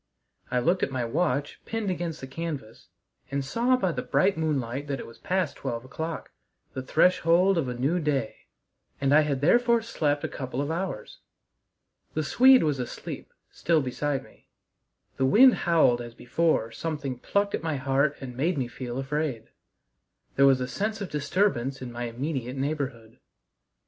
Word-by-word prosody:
I 125 - 0
looked 175 +10 +2
at - - +1
my 130 -3 -2
watch 145 +3 -1
pinned 225 -4 -2
against 170 -3 -4
the - - -5
canvas, 135 - -6 0.4
and 140 -1 -2
saw 240 - +2
by 190 -7 0
the - - -3
bright 195 +1 +2
moonlight 145 -4 -2
that 140 -2 -2
it - - -6
was 115 0 -14
past 185 0 -1
twelve 115 +1 -4
o'clock 160 +4 -5 0.4
the 130 - -4
threshold 180 +5 +3
of 160 -6 0
a 125 - -3
new 140 +9 +1
day 140 -8 -2 0.5
and 135 0 +2
I 155 - +7
had 140 -3 -1
therefore 235 +8 +4
slept 150 -10 -1
a - - 0
couple 130 -1 -5
of 145 +2 -1
hours. 170 - -4 1.0
The 155 - 0
Swede 260 - +6
was 150 -4 0
asleep 125 - -6 0.2
still 165 -4 +1
beside 135 +2 -2
me; - - -21 0.7
the 135 - +2
wind 245 - +7
howled 160 -8 +3
as 120 -1 -9
before 140 -3 0
something 140 -1 -4
plucked 200 +8 0
at - - -1
my 160 -2 -1
heart 140 +2 +1
and 125 -3 -7
made 160 +6 0
me 130 -3 -1
feel 120 0 -6
afraid. 135 -3 -3 0.8
There 140 0 +6
was 135 -1 +5
a 125 - -1
sense 210 - -2
of 195 - -5
disturbance 140 -3 0
in 125 -2 -7
my 120 +1 -4
immediate 130 +1 -4
neighborhood. 135 -6 -4
145 Hz, 170 wpm, -27 LUFS, 130-170 Hz, 1.0 s, I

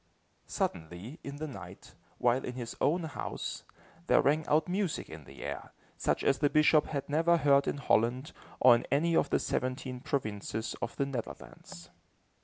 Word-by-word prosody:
Suddenly, 90 - -4
in 140 - -6
the 155 +2 -4
night, 95 - -10 0.2
while 125 +2 +2
in 125 - -4
his 120 -2 -6
own 170 +4 +2
house, 155 -3 -5 0.4
there - - +5
rang 150 +2 +2
out 155 +1 +3
music 185 -2 -1
in 80 -2 -10
the 70 - -11
air, - - -6 0.2
such - - 0
as 135 - +2
the 145 - +3
bishop 155 0 +4
had 140 -2 -3
never 165 +4 +3
heard 140 -2 +4
in - - -1
Holland, 125 +1 +1 0.3
or 125 -1 +8
in 120 - 0
any 165 +4 +2
of 145 - +3
the - - +3
seventeen 130 0 -2
provinces 110 -4 -3
of - - -3
the 140 - 0
Netherlands. 115 -8 -8
140 Hz, 170 wpm, -31 LUFS, 120-150 Hz, 0.4 s, or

